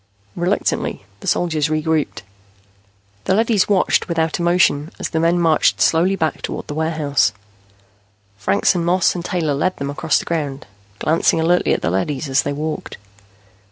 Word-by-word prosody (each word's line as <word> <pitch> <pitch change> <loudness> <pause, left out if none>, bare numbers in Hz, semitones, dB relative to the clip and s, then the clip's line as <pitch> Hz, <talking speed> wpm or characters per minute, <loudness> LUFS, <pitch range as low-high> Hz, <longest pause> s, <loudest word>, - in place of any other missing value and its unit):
Reluctantly, 180 +4 -1
the - - -10
soldiers 160 -4 +1
regrouped. 155 -3 -1 1.0
The 190 - +2
leadys 220 -3 +2
watched 195 -3 +2
without 165 -1 0
emotion 170 -4 +2
as - - -4
the 160 - -1
men 170 +2 +2
marched 165 -3 +2
slowly 175 +4 +3
back 160 -5 -2
toward - - -5
the - - -6
warehouse. 150 -8 0 1.0
Franks 100 0 +1
and 175 -2 -1
Moss 175 +1 +2
and 175 - -5
Taylor 165 -5 -1
led 185 +7 -1
them 140 0 -3
across 160 +2 +1
the - - -3
ground, 145 -5 -3 0.3
glancing 160 +6 +2
alertly 175 +2 +2
at - - 0
the 85 - 0
leadys 135 - -2
as 135 +1 +3
they 145 - -3
walked. 155 +2 -5
160 Hz, 160 wpm, -19 LUFS, 145-175 Hz, 1.0 s, slowly